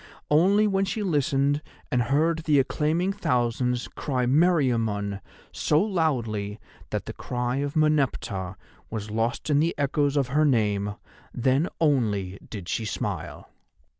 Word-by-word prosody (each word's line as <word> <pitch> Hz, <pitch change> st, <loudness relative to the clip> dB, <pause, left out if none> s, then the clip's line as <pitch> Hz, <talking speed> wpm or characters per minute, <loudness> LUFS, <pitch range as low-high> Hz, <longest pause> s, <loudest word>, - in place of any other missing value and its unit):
Only 195 Hz, +8 st, +5 dB
when 195 Hz, -2 st, +1 dB
she 200 Hz, +3 st, -2 dB
listened 145 Hz, -4 st, +1 dB, 0.3 s
and 125 Hz, -, +2 dB
heard 155 Hz, +7 st, +2 dB
the 155 Hz, -2 st, +2 dB
acclaiming 155 Hz, +7 st, +1 dB
thousands 125 Hz, -, 0 dB
cry 130 Hz, -3 st, -2 dB
Meriamun 120 Hz, -, +2 dB, 0.3 s
so 150 Hz, -, +2 dB
loudly 120 Hz, -, -1 dB, 0.3 s
that -, -, -3 dB
the -, -, -6 dB
cry 125 Hz, +1 st, -2 dB
of 145 Hz, 0 st, -2 dB
Meneptah 135 Hz, -, 0 dB, 0.3 s
was 105 Hz, -1 st, -5 dB
lost 115 Hz, +7 st, -1 dB
in 145 Hz, -, +4 dB
the 165 Hz, +3 st, +1 dB
echoes 145 Hz, 0 st, +1 dB
of 135 Hz, -3 st, +1 dB
her 150 Hz, +4 st, +3 dB
name—then 115 Hz, -, 0 dB
only 105 Hz, -, +1 dB
did 100 Hz, -6 st, -7 dB
she 115 Hz, -, -1 dB
smile. 105 Hz, -, -4 dB
135 Hz, 130 wpm, -26 LUFS, 115-155 Hz, 0.3 s, Only